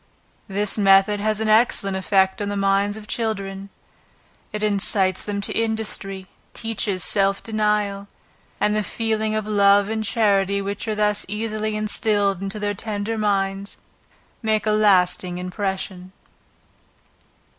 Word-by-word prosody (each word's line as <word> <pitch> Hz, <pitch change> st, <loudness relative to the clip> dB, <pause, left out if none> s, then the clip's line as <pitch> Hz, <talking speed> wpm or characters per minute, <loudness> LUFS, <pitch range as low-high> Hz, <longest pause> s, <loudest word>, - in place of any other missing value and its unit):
This 205 Hz, +2 st, -2 dB
method 195 Hz, +1 st, +4 dB
has 215 Hz, +1 st, -1 dB
an 220 Hz, -, -1 dB
excellent 215 Hz, -3 st, +2 dB
effect 190 Hz, +1 st, +1 dB
on 205 Hz, -, -2 dB
the 205 Hz, -, -3 dB
minds 200 Hz, +1 st, +1 dB
of 215 Hz, -, -10 dB
children; 200 Hz, -4 st, -3 dB, 0.8 s
it 210 Hz, 0 st, -4 dB
incites 195 Hz, -2 st, +2 dB
them 205 Hz, -1 st, -3 dB
to -, -, -2 dB
industry, 220 Hz, -4 st, -3 dB, 0.3 s
teaches 210 Hz, -5 st, -1 dB
self 195 Hz, +2 st, +4 dB
denial, 210 Hz, -2 st, -1 dB, 0.5 s
and 210 Hz, 0 st, +1 dB
the 215 Hz, -, +1 dB
feelings 220 Hz, 0 st, -1 dB
of 215 Hz, -, -3 dB
love 200 Hz, -1 st, +4 dB
and 220 Hz, 0 st, -2 dB
charity 200 Hz, -3 st, +1 dB
which 200 Hz, +2 st, -4 dB
are 215 Hz, -, -1 dB
thus 210 Hz, -1 st, +1 dB
early 215 Hz, 0 st, -3 dB
instilled 205 Hz, -2 st, 0 dB
into 195 Hz, +1 st, -3 dB
their 205 Hz, 0 st, -2 dB
tender 210 Hz, +1 st, -3 dB
minds, 200 Hz, -2 st, -1 dB, 0.6 s
make 220 Hz, -2 st, 0 dB
a 215 Hz, -, +2 dB
lasting 185 Hz, -4 st, +2 dB
impression. 185 Hz, 0 st, -4 dB
205 Hz, 135 wpm, -22 LUFS, 195-215 Hz, 0.8 s, method